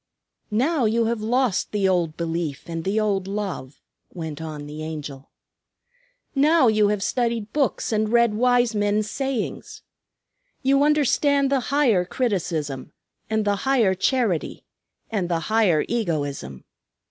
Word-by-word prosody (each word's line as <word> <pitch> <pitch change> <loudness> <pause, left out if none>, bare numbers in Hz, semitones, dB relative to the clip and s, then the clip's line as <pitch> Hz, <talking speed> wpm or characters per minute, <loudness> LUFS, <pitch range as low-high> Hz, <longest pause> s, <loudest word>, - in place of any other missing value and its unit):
"Now 255 +5 +1
you 225 +1 +2
have 230 -1 -1
lost 240 -2 0
the 205 -2 +1
old 175 -4 0
belief 165 -3 -3
and 165 -1 -4
the 200 +3 +1
old 200 -3 0
love," 195 -10 -5 0.3
went 160 -4 -6
on 155 -2 -6
the 150 +1 -8
Angel. 150 -3 -7 1.0
"Now 300 0 +4
you 215 -2 +4
have 205 -1 0
studied 230 -2 -1
books 285 -5 0
and 215 0 0
read 235 -2 +4
wise 245 +1 +2
men's 205 0 +1
sayings. 270 -4 -4 0.8
You 275 +1 +3
understand 285 -1 +3
the 275 - +3
higher 255 -10 +3
criticism, 165 - -2 0.4
and 220 -1 0
the 205 -1 +1
higher 235 -5 +2
charity, 200 - -1 0.5
and 195 -5 -1
the 170 -2 0
higher 195 -9 +3
egoism. 145 - -3
210 Hz, 135 wpm, -23 LUFS, 170-245 Hz, 1.0 s, Now